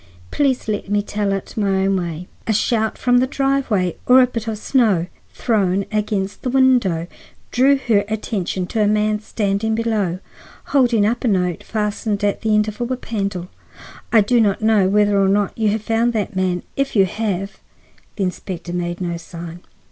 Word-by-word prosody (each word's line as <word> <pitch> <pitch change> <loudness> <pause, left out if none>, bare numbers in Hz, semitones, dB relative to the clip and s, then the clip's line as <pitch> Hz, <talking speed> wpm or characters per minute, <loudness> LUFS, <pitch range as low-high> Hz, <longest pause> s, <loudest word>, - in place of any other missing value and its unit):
Please 270 -5 0
let 205 -2 -3
me 205 0 +1
tell 205 -1 -2
it 195 -1 -4
my 195 -3 +1
own 195 0 +2
way. 175 -1 -4 0.2
A 220 - +2
shout 220 +1 0
from 245 -1 +3
the 255 - +2
driveway, 265 - 0
or 255 +1 +7
a 255 - +7
bit 235 -2 -5
of 220 -1 -2
snow 215 -7 +2 0.3
thrown 200 -4 +1
against 210 -2 -2
the 255 - -2
window, 245 -11 +3 0.5
drew 270 +3 +4
her 225 -6 +2
attention 205 -4 -2
to 220 +4 -2
a 210 - +3
man 210 0 +1
standing 210 0 -1
below, 215 -6 0 0.6
holding 240 -6 +4
up 235 +3 0
a - - +1
note 180 -5 0
fastened 210 -1 -2
to 205 -1 +1
the 220 -1 +2
end 210 0 +2
of 215 +2 -6
a - - +2
whip 255 +1 -4
handle. 195 -5 -3 0.6
I 225 - +6
do 235 +3 +3
not 205 0 +1
know 215 -4 +4
whether 205 0 +3
or 190 - +3
not 200 0 +1
you 220 -2 +1
have 215 +1 -1
found 230 +2 +1
that 210 -2 -2
man. 185 -1 0
If 275 -2 -1
you 195 -2 +5
have—" 195 -1 -3 0.6
The 200 - -2
inspector 180 -1 -5
made 175 0 -3
no 170 -1 -2
sign. 170 0 -9
210 Hz, 185 wpm, -20 LUFS, 190-230 Hz, 0.6 s, or